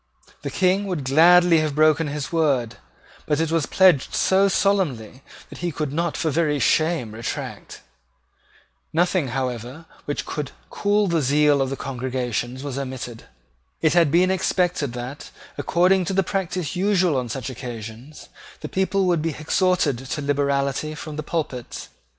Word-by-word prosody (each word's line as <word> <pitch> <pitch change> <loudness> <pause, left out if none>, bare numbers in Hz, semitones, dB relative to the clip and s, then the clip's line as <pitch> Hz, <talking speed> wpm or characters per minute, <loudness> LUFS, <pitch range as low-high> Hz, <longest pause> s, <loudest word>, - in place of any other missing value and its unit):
The 140 - -4
King 185 +7 +1
would 175 -7 -3
gladly 170 +5 +6
have 155 -2 -1
broken 155 +1 +3
his 145 -1 -4
word; 140 -9 +1 0.5
but 150 0 +1
it 165 -1 0
was 165 -3 +1
pledged 180 -8 +3
so 195 +1 +3
solemnly 165 - 0 0.3
that - - -11
he 175 0 -2
could 150 -2 -3
not 170 +1 -1
for 160 - 0
very 150 -1 +1
shame 155 -4 +1
retract. 115 +1 -6 1.1
Nothing, 175 -2 +1
however, 125 +3 -4 0.2
which 145 - -3
could 150 -3 -5 0.2
cool 205 +1 +1
the 170 -4 +1
zeal 145 +1 +3
of 135 0 -2
congregations 130 -1 -3
was 140 -2 -4
omitted. 130 -3 -6 0.5
It 155 -2 +2
had 170 -3 +4
been 180 +5 +3
expected 180 -7 0
that, 125 +4 -7 0.3
according 180 +2 +2
to 195 - -2
the 195 +1 +2
practice 180 -3 -3
usual 185 -4 +2
on 125 -2 -2
such 130 +2 -4
occasions, 120 +3 -9 0.3
the - - -6
people 190 0 0
would 175 -3 +2
be 160 -2 -2
exhorted 160 -4 +1
to 135 +3 -5
liberality 140 +1 0
from 150 0 -7
the 155 - -3
pulpits. 145 -6 -4
150 Hz, 150 wpm, -23 LUFS, 135-175 Hz, 1.1 s, gladly